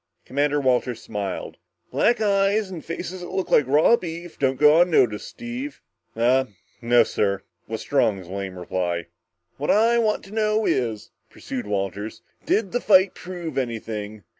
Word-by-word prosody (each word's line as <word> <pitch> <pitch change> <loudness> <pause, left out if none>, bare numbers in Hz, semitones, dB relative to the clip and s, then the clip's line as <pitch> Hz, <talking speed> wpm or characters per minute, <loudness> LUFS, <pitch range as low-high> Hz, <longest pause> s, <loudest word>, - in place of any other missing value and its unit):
Commander 145 +2 +1
Walters 125 -3 +1
smiled. 100 -3 -5 0.3
"Black 235 0 +2
eyes 200 -1 +2
and 170 -4 -7
faces 180 +2 -6
that 175 - -7
looked 190 - -3
like 150 - +5
raw 150 - +5
beef 170 -3 -7
don't 135 -1 +1
go 150 +3 +7
unnoticed, 125 -12 +2
Steve." 245 +4 -6 0.4
"Uhh 125 +3 +3 0.3
no, 120 0 +5
sir," 100 -3 -1 0.2
was - - -4
Strong's 95 -5 +1
lame 95 0 -5
reply. 85 -1 -2 0.5
"What 145 - -3
I 230 +3 +4
want 215 -2 +1
to 195 - -13
know 215 0 +1
is," 115 -5 -1 0.2
pursued 125 -5 -6
Walters, 100 +1 -3 0.2
"did 205 -3 +1
the 245 - -1
fight 190 -2 +5
prove 175 -5 -5
anything? 110 -4 -5
140 Hz, 150 wpm, -23 LUFS, -, 0.5 s, go